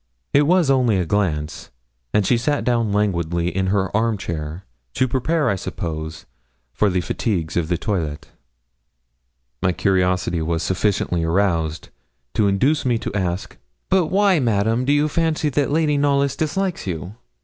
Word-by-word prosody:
It 145 Hz, 0 st, +4 dB
was 175 Hz, -4 st, +4 dB
only 125 Hz, -6 st, +3 dB
a 90 Hz, -, 0 dB
glance, 80 Hz, -5 st, -1 dB, 0.4 s
and 105 Hz, -, +2 dB
she 125 Hz, -, +3 dB
sat 145 Hz, +5 st, 0 dB
down 115 Hz, -3 st, +1 dB
languidly 85 Hz, -4 st, 0 dB
in 95 Hz, 0 st, 0 dB
her 95 Hz, 0 st, 0 dB
arm 110 Hz, 0 st, +1 dB
chair 80 Hz, -1 st, -5 dB, 0.3 s
to 130 Hz, -, +2 dB
prepare, 145 Hz, +5 st, 0 dB
I 100 Hz, -, +2 dB
suppose, 80 Hz, -3 st, -5 dB, 0.5 s
for 105 Hz, -, +2 dB
the 90 Hz, -1 st, 0 dB
fatigues 85 Hz, -4 st, -2 dB
of 85 Hz, -2 st, 0 dB
the 85 Hz, 0 st, 0 dB
toilet. 80 Hz, -7 st, -3 dB, 1.3 s
My 90 Hz, -, +2 dB
curiosity 90 Hz, -3 st, +1 dB
was 80 Hz, 0 st, -1 dB
sufficiently 95 Hz, -3 st, 0 dB
aroused 80 Hz, -2 st, 0 dB, 0.4 s
to 110 Hz, -2 st, +2 dB
induce 130 Hz, +11 st, +2 dB
me 120 Hz, -3 st, +1 dB
to -, -, -5 dB
ask 95 Hz, -2 st, -3 dB, 0.3 s
'But 185 Hz, -4 st, +3 dB
why, 195 Hz, -1 st, +3 dB
Madame, 115 Hz, 0 st, +1 dB
do 140 Hz, -, +2 dB
you 145 Hz, +1 st, +3 dB
fancy 160 Hz, -1 st, 0 dB
that 145 Hz, 0 st, 0 dB
Lady 150 Hz, -1 st, +2 dB
Knollys 140 Hz, -1 st, +2 dB
dislikes 175 Hz, -, -2 dB
you?' 90 Hz, +2 st, -4 dB
100 Hz, 155 wpm, -21 LUFS, 85-140 Hz, 1.3 s, It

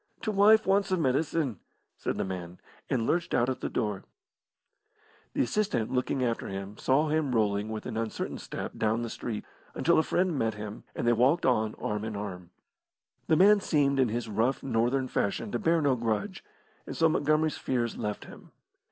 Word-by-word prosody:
"T' 215 Hz, -, -2 dB
wife 215 Hz, +2 st, +5 dB
wants 195 Hz, +1 st, +2 dB
her 185 Hz, -, +1 dB
medicine," 140 Hz, -, 0 dB, 0.4 s
said -, -, -3 dB
the -, -, 0 dB
man, 90 Hz, -2 st, -6 dB, 0.3 s
and 115 Hz, -3 st, 0 dB
lurched 170 Hz, +5 st, 0 dB
out 120 Hz, +2 st, +2 dB
at 130 Hz, -, -3 dB
the -, -, -2 dB
door. 105 Hz, -5 st, -2 dB, 1.3 s
The -, -, +2 dB
assistant, 190 Hz, -, 0 dB
looking 130 Hz, +1 st, 0 dB
after 115 Hz, -2 st, -1 dB
him, 95 Hz, +1 st, -6 dB
saw 145 Hz, +4 st, +2 dB
him 150 Hz, -4 st, 0 dB
rolling, 105 Hz, -1 st, +1 dB
with 110 Hz, -1 st, -5 dB
an 115 Hz, -3 st, -4 dB
uncertain 115 Hz, -1 st, -3 dB
step, -, -, -6 dB
down 110 Hz, +2 st, 0 dB
the 115 Hz, -, -4 dB
street, 110 Hz, -3 st, -5 dB, 0.3 s
until 170 Hz, -1 st, +3 dB
a -, -, +6 dB
friend 180 Hz, +1 st, 0 dB
met 115 Hz, -5 st, 0 dB
him, 105 Hz, 0 st, -7 dB
and -, -, -2 dB
they 120 Hz, -, +5 dB
walked 130 Hz, +9 st, +3 dB
on 110 Hz, -4 st, +2 dB
arm 105 Hz, 0 st, -3 dB
in 110 Hz, -1 st, -4 dB
arm. 90 Hz, -4 st, -6 dB, 0.8 s
The 160 Hz, -, +4 dB
man 205 Hz, +4 st, +6 dB
seemed 140 Hz, -6 st, +1 dB
in 130 Hz, -3 st, +3 dB
his 115 Hz, +1 st, -3 dB
rough 115 Hz, +5 st, 0 dB
Northern 130 Hz, +1 st, +1 dB
fashion 105 Hz, -1 st, -1 dB
to 120 Hz, -, -1 dB
bear 165 Hz, -1 st, +2 dB
no 140 Hz, -3 st, +3 dB
grudge, 110 Hz, -4 st, -2 dB, 0.4 s
and -, -, -6 dB
so 165 Hz, -, +5 dB
Montgomery's 155 Hz, 0 st, +1 dB
fears 120 Hz, -3 st, -1 dB
left 105 Hz, -1 st, -4 dB
him. -, -, -13 dB
120 Hz, 185 wpm, -29 LUFS, 110-155 Hz, 1.3 s, a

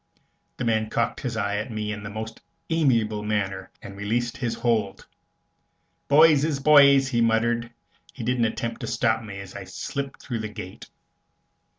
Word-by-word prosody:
The 125 Hz, -, -3 dB
man 110 Hz, -1 st, +1 dB
cocked 115 Hz, -1 st, -1 dB
his 125 Hz, -5 st, -4 dB
eye 100 Hz, -1 st, -1 dB
at 110 Hz, +4 st, -3 dB
me 105 Hz, -1 st, -3 dB
in 105 Hz, -1 st, -5 dB
the 100 Hz, -, -6 dB
most 110 Hz, +2 st, -7 dB, 0.3 s
amiable 115 Hz, -10 st, +2 dB
manner, 100 Hz, -2 st, -2 dB
and 100 Hz, -, -9 dB
released 115 Hz, +4 st, -1 dB
his 120 Hz, -3 st, -2 dB
hold. 110 Hz, -5 st, -1 dB, 1.0 s
"Boys 150 Hz, 0 st, +6 dB
is 155 Hz, -3 st, 0 dB
boys," 140 Hz, -2 st, +6 dB
he 120 Hz, -3 st, +1 dB
muttered. 115 Hz, +1 st, +1 dB, 0.4 s
He 125 Hz, -, -8 dB
didn't 120 Hz, 0 st, +1 dB
attempt 115 Hz, +1 st, -3 dB
to -, -, -4 dB
stop 115 Hz, -1 st, +1 dB
me 100 Hz, -3 st, -8 dB
as 100 Hz, -1 st, -9 dB
I -, -, -7 dB
slipped 140 Hz, -1 st, -5 dB
through 120 Hz, -3 st, -4 dB
the 110 Hz, -1 st, -4 dB
gate. 95 Hz, -3 st, -9 dB
115 Hz, 170 wpm, -25 LUFS, 105-125 Hz, 1.0 s, Boys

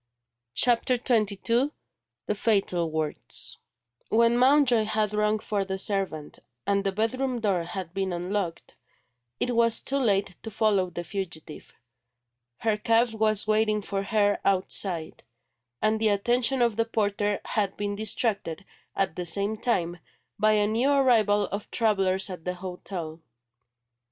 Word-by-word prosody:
CHAPTER 245 Hz, +1 st, +3 dB
XXII 230 Hz, +2 st, +1 dB, 0.6 s
THE -, -, 0 dB
FATAL 195 Hz, -6 st, +1 dB
WORDS 155 Hz, -1 st, -4 dB, 0.5 s
WHEN 230 Hz, +1 st, +4 dB
Mountjoy 250 Hz, -3 st, +4 dB
had 215 Hz, -1 st, 0 dB
rung 210 Hz, 0 st, +2 dB
for 210 Hz, -2 st, -2 dB
the 190 Hz, 0 st, -4 dB
servant, 190 Hz, -7 st, -2 dB, 0.3 s
and 200 Hz, 0 st, +1 dB
the 195 Hz, -, 0 dB
bedroom 245 Hz, +5 st, -1 dB
door 200 Hz, -5 st, +1 dB
had 175 Hz, -1 st, -6 dB
been 195 Hz, -1 st, -1 dB
unlocked, 175 Hz, 0 st, -3 dB, 0.6 s
it 245 Hz, -1 st, 0 dB
was 230 Hz, -1 st, +3 dB
too 275 Hz, +1 st, 0 dB
late 200 Hz, -6 st, +1 dB
to 225 Hz, -, -6 dB
follow 205 Hz, -4 st, +1 dB
the 175 Hz, 0 st, -5 dB
fugitive. 175 Hz, -5 st, -7 dB, 0.8 s
Her 220 Hz, -2 st, 0 dB
cab 230 Hz, +2 st, +3 dB
was 215 Hz, -1 st, +2 dB
waiting 215 Hz, -1 st, +1 dB
for 195 Hz, 0 st, -2 dB
her 205 Hz, 0 st, +1 dB
outside; 185 Hz, -3 st, -1 dB, 0.6 s
and 215 Hz, 0 st, +2 dB
the 220 Hz, -, +4 dB
attention 240 Hz, +5 st, +2 dB
of 230 Hz, -3 st, +1 dB
the 230 Hz, -, +2 dB
porter 205 Hz, -2 st, 0 dB
had 200 Hz, -3 st, -1 dB
been 205 Hz, 0 st, -2 dB
distracted, 205 Hz, -4 st, -1 dB, 0.3 s
at 190 Hz, -4 st, 0 dB
the 180 Hz, -1 st, -4 dB
same 200 Hz, +5 st, 0 dB
time, 180 Hz, -7 st, -1 dB, 0.4 s
by 215 Hz, +1 st, +4 dB
a 210 Hz, -1 st, +3 dB
new 230 Hz, +6 st, +1 dB
arrival 230 Hz, -7 st, +4 dB
of 205 Hz, +1 st, -5 dB
travellers 195 Hz, -4 st, +1 dB
at 180 Hz, -3 st, -8 dB
the 180 Hz, +1 st, -3 dB
hotel. 180 Hz, -3 st, -7 dB
205 Hz, 140 wpm, -26 LUFS, 190-225 Hz, 0.8 s, WHEN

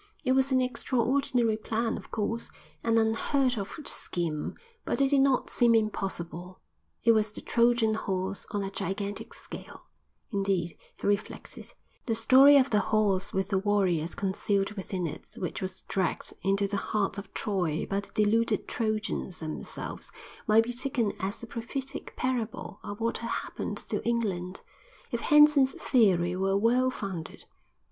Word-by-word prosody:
It 255 Hz, -, +1 dB
was 265 Hz, +1 st, +3 dB
an 260 Hz, 0 st, +4 dB
extraordinary 250 Hz, -2 st, +1 dB
plan, 225 Hz, +1 st, -1 dB
of -, -, -9 dB
course; 230 Hz, +2 st, -2 dB, 0.3 s
an 230 Hz, 0 st, +2 dB
unheard 245 Hz, +4 st, +2 dB
of 200 Hz, -3 st, -4 dB, 0.2 s
scheme; 160 Hz, -4 st, -3 dB, 0.3 s
but -, -, -2 dB
it 275 Hz, 0 st, +3 dB
did 280 Hz, -1 st, +5 dB
not 270 Hz, -2 st, +2 dB
seem 235 Hz, -1 st, +4 dB
impossible. 185 Hz, -4 st, -2 dB, 0.4 s
It 230 Hz, -, +6 dB
was 215 Hz, -1 st, +2 dB
the -, -, -8 dB
Trojan 235 Hz, -2 st, +3 dB
Horse 190 Hz, -2 st, -3 dB
on 205 Hz, -1 st, -2 dB
a 195 Hz, -, -4 dB
gigantic 200 Hz, +1 st, -4 dB
scale; -, -, -10 dB, 0.5 s
indeed, 195 Hz, -5 st, 0 dB, 0.2 s
he -, -, -6 dB
reflected, 205 Hz, 0 st, -2 dB, 0.4 s
the 225 Hz, -, +1 dB
story 265 Hz, +5 st, +7 dB
of 270 Hz, -1 st, +3 dB
the 210 Hz, -, +4 dB
horse 200 Hz, -3 st, +1 dB
with 190 Hz, 0 st, -1 dB
the 195 Hz, -2 st, +2 dB
warriors 190 Hz, -5 st, +1 dB
concealed 195 Hz, +1 st, 0 dB
within 190 Hz, -3 st, -4 dB
it 155 Hz, -1 st, -7 dB
which 180 Hz, -, -4 dB
was 185 Hz, 0 st, -5 dB
dragged 185 Hz, -3 st, -2 dB
into 195 Hz, +2 st, +1 dB
the 200 Hz, 0 st, -1 dB
heart 200 Hz, 0 st, -1 dB
of 200 Hz, -, -10 dB
Troy 180 Hz, -7 st, -1 dB
by 195 Hz, -, 0 dB
the 200 Hz, -, -9 dB
deluded 215 Hz, +1 st, +2 dB
Trojans 215 Hz, -4 st, -2 dB
themselves 155 Hz, -1 st, -5 dB, 0.4 s
might 220 Hz, +1 st, +6 dB
be 245 Hz, +2 st, -4 dB
taken 245 Hz, -4 st, -1 dB
as 200 Hz, +5 st, -4 dB
a -, -, -3 dB
prophetic 245 Hz, +4 st, -5 dB
parable 235 Hz, -5 st, -3 dB
of 205 Hz, 0 st, -7 dB
what 230 Hz, 0 st, -1 dB
had 230 Hz, -, -4 dB
happened -, -, -3 dB
to -, -, -4 dB
England—if 210 Hz, -, -4 dB
Henson's 295 Hz, -3 st, +6 dB
theory 180 Hz, -8 st, +3 dB
were 195 Hz, +1 st, +1 dB
well 245 Hz, +5 st, +3 dB
founded. 190 Hz, -9 st, -6 dB
215 Hz, 155 wpm, -29 LUFS, 195-235 Hz, 0.5 s, story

